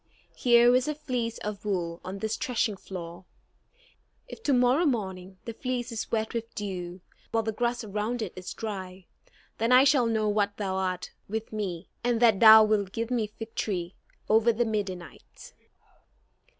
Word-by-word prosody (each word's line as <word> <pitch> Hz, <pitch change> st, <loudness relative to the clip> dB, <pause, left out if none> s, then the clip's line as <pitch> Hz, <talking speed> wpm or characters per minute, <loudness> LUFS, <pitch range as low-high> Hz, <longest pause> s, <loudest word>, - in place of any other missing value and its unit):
Here 240 Hz, 0 st, +5 dB
is 255 Hz, +2 st, +2 dB
a 300 Hz, -, -1 dB
fleece 250 Hz, -6 st, -3 dB
of 210 Hz, -1 st, -6 dB
wool 175 Hz, -5 st, -2 dB
on 185 Hz, +2 st, -6 dB
this 220 Hz, +2 st, -2 dB
threshing 230 Hz, -3 st, -1 dB
floor. 175 Hz, -2 st, -8 dB, 1.0 s
If 475 Hz, -, -10 dB
to 295 Hz, -, 0 dB
morrow 255 Hz, +6 st, +4 dB
morning 190 Hz, -6 st, -3 dB
the 230 Hz, -, -5 dB
fleece 250 Hz, 0 st, -3 dB
is 225 Hz, -, -4 dB
wet 220 Hz, -1 st, -1 dB
with 230 Hz, -1 st, -5 dB
dew, 185 Hz, -3 st, -5 dB, 0.3 s
while 225 Hz, 0 st, 0 dB
the 220 Hz, -, -1 dB
grass 240 Hz, +1 st, -1 dB
around 215 Hz, +3 st, -2 dB
it 195 Hz, -, -6 dB
is 185 Hz, 0 st, -7 dB
dry, 190 Hz, -4 st, -6 dB, 0.5 s
then 230 Hz, +2 st, +1 dB
I 255 Hz, +1 st, +8 dB
shall 275 Hz, -4 st, +4 dB
know 215 Hz, -2 st, +1 dB
that 205 Hz, -1 st, 0 dB
thou 195 Hz, -3 st, -2 dB
art 185 Hz, -1 st, -2 dB, 0.2 s
with 220 Hz, +1 st, -4 dB
me; 190 Hz, -5 st, -4 dB, 0.2 s
and 240 Hz, -1 st, +1 dB
that 225 Hz, -5 st, +5 dB
thou 220 Hz, -1 st, +10 dB
wilt 205 Hz, -3 st, +1 dB
give 230 Hz, +1 st, -3 dB
me 220 Hz, -4 st, -1 dB
victory 195 Hz, -5 st, -3 dB, 0.3 s
over 225 Hz, +2 st, +4 dB
the 235 Hz, +1 st, 0 dB
Midianites." 195 Hz, -5 st, -6 dB
220 Hz, 165 wpm, -28 LUFS, 190-235 Hz, 1.0 s, thou